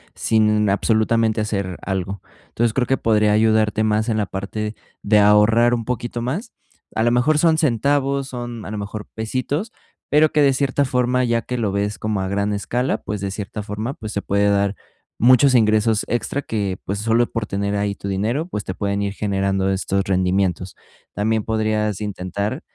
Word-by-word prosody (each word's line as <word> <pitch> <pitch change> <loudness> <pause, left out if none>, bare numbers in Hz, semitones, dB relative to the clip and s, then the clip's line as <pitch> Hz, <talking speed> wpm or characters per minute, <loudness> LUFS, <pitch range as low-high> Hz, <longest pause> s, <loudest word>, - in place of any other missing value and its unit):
sin 105 -1 +2
absolutamente 110 +2 +1
hacer 100 -4 -2
algo, 95 0 -3 0.2
entonces, 115 -1 0
creo 125 -1 0
que 135 - +2
podría 105 -2 +2
ayudarte 110 -1 +2
más 110 +1 +1
en 110 - 0
la 105 - +1
parte 105 +3 -5 0.3
de 105 0 +4
ahorrar 105 +4 +5
un 115 -2 -4
poquito 120 0 -3
más, 170 - -3 0.4
a 110 - +1
lo 120 - +3
mejor 125 +6 +3
son 160 0 +3
centavos, 140 0 +1
son 120 -3 -6
a - - -6
lo 105 - -4
mejor, 105 +1 -6
pesitos, 130 - -3 0.4
pero 150 +1 +4
que 150 - +2
de 140 -1 +4
cierta 140 +1 +1
forma, 125 -1 +1
ya 115 -1 0
que 125 - -4
lo 110 -4 0
ves 100 +1 -2
como 105 -2 -1
a 95 - -2
gran 100 +2 -1
escala, 120 +5 -1
pues, 105 0 -4
de 100 - -2
cierta 100 +2 -5
forma, 105 +5 -4
pues, 110 -5 -7
se 100 - -2
puede 100 +1 +2
dar 100 0 +2 0.5
muchos 130 +3 +5
ingresos 110 -1 +3
extra 120 +4 -2
que, 100 -6 -2
pues, 100 +1 -3
solo 115 +2 +2
por 115 -2 -3
tener 100 +1 -2
ahí 100 0 -1
tu 100 - -7
dinero, 110 - -1
pues, 105 - -4
te 95 - -4
pueden 100 -1 -1
ir 100 -1 -2
generando 95 -2 0
estos 95 +1 0
rendimientos, 95 -1 0 0.4
también 110 +1 0
podrías 110 -2 -1
intentar 100 - -3
110 Hz, 185 wpm, -21 LUFS, 100-120 Hz, 0.5 s, ahorrar